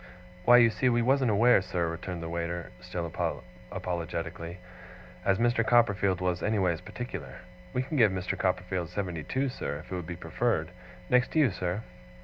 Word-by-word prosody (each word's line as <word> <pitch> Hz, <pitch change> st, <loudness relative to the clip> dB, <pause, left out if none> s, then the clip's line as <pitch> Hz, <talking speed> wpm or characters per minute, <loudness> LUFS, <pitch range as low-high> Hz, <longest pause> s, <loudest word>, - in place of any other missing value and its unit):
'Why, 120 Hz, -, +8 dB
you 120 Hz, -2 st, +6 dB
see 125 Hz, +4 st, +2 dB
we 120 Hz, -1 st, +2 dB
wasn't 130 Hz, 0 st, +3 dB
aware, 110 Hz, +1 st, +5 dB
sir,' 90 Hz, -2 st, -1 dB
returned 85 Hz, +1 st, -5 dB
the -, -, -4 dB
waiter, 85 Hz, +1 st, -3 dB
still 90 Hz, -1 st, -4 dB, 0.7 s
apologetically, 85 Hz, -1 st, -4 dB, 0.7 s
'as 95 Hz, 0 st, +3 dB
Mr. 120 Hz, 0 st, +2 dB
Copperfield 100 Hz, -6 st, +3 dB
was 90 Hz, -1 st, 0 dB
anyways 95 Hz, -6 st, +1 dB
particular. 100 Hz, -, -7 dB, 0.3 s
We 125 Hz, -, 0 dB
can 150 Hz, +3 st, -3 dB
give 110 Hz, -6 st, +6 dB
Mr. 90 Hz, -1 st, -2 dB
Copperfield 90 Hz, -2 st, -1 dB
seventy 90 Hz, -3 st, -3 dB
two, 130 Hz, -, -1 dB
sir, 75 Hz, -, -4 dB
if 75 Hz, -, -12 dB
it -, -, -2 dB
would 90 Hz, -3 st, -5 dB
be 85 Hz, -, -4 dB
preferred. 85 Hz, 0 st, -1 dB, 0.4 s
Next 125 Hz, -, +2 dB
you, 150 Hz, -7 st, +5 dB
sir. 90 Hz, +3 st, -3 dB
95 Hz, 165 wpm, -29 LUFS, 85-120 Hz, 0.7 s, Why